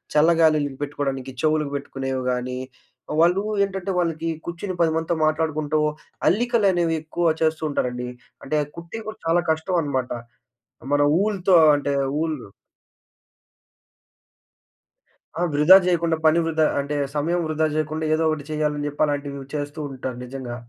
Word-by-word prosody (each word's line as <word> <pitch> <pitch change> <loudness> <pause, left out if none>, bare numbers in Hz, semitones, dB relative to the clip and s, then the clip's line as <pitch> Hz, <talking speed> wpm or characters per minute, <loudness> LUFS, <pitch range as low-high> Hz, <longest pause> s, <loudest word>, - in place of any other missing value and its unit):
చల్లగాలుల‌‌‌కి 155 -3 +3
పెట్టుకోడానికి 135 -2 -3
చెవులుకి 155 -2 +1
పెట్టుకునేవి 135 -2 -3
గానీ, 125 0 -3 0.6
వాళ్ళూ 175 +3 +4 0.2
ఏంటంటే, 195 -1 -3
వాళ్ళకి 165 -1 -1 0.2
కూర్చుని 175 +3 -4
10 165 -1 +3
మందితో 165 +1 0
మాట్లాడుకుంటూ, 155 -1 0 0.5
అల్లికలనేవి 195 -6 +2
ఎక్కువ 160 +1 0
చేస్తూంటారండి. 145 -6 -1 0.3
అంటే, 150 +3 -1 0.2
కుట్టేవి 175 +7 -8
గూడా 215 - -7
చాలా 170 +1 +3
కష్టవనమాట. 160 -6 -1 0.8
మన 145 - +3 0.2
ఊల్‌తో 195 -3 +2 0.2
అంటే, 145 0 -1 0.3
ఊలు 160 -3 -2 3.0
ఆ! - - -2
వృధా 150 +6 +8
జెయకుండా, 170 -2 +1
పని 160 +2 +5
వృధా 160 -1 +2
అంటే, 140 +1 -2 0.2
సమయం 170 +4 0
వృధా 155 0 +1
జెయకుండా, 155 +1 -2
ఏదో 160 - 0
ఒకటి 155 -2 -3
చెయ్యాలని 150 -1 -1
జెప్పి, 145 +1 -1
అలాంటివీ 140 -1 -3
చేస్తూంటారు 145 -4 -5
నిజంగా. 125 -1 -6
155 Hz, 115 wpm, -23 LUFS, 145-170 Hz, 3.0 s, వృధా